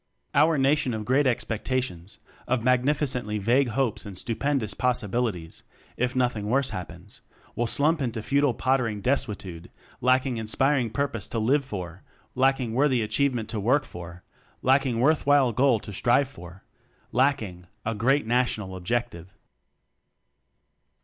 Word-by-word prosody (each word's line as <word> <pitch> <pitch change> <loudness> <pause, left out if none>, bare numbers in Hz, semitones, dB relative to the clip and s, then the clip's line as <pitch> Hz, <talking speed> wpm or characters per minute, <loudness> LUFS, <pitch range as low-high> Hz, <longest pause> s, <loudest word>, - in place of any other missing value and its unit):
Our 155 +2 +4
Nation 135 -2 +2
of 110 -1 -5
great 135 +4 +3
expectations, 115 -6 -2 0.3
of 125 -2 0
magnificently 125 -3 +1
vague 120 +7 +2
hopes 120 -1 -1
and 100 -4 -9
stu 115 +2 -3
pendous 135 -7 -1
possibilities, 115 -8 -1 0.3
(if^ 125 +1 -1
nothing 120 -5 0
worse 135 +2 +1
happens), 90 +2 -9 0.3
will 120 - 0
slump 155 +5 +2
into 115 -4 -3
futile 140 -2 +2
pottering 120 -6 0
desuetude, 100 -10 -2 0.3
lacking 130 0 +2
inspiring 125 +3 +1
purpose 115 -4 -2
to - - -4
live 130 +6 +2
for, 95 -7 -7 0.3
lacking 130 -3 +1
worthy 130 -2 +2
achievement 120 0 0
to 110 - -3
work 130 +8 +2
for, 85 0 -10 0.4
lacking 130 -2 +2
worthwhile 145 -1 +3
goal 125 0 +3
to 105 - -8
strive 125 +7 +2
for, 90 -7 -13 0.5
lacking 110 -9 0 0.2
a 115 - 0
Great 130 +6 +1
National 110 -5 0
Objective. 95 -2 -3
120 Hz, 130 wpm, -26 LUFS, 105-135 Hz, 0.5 s, Our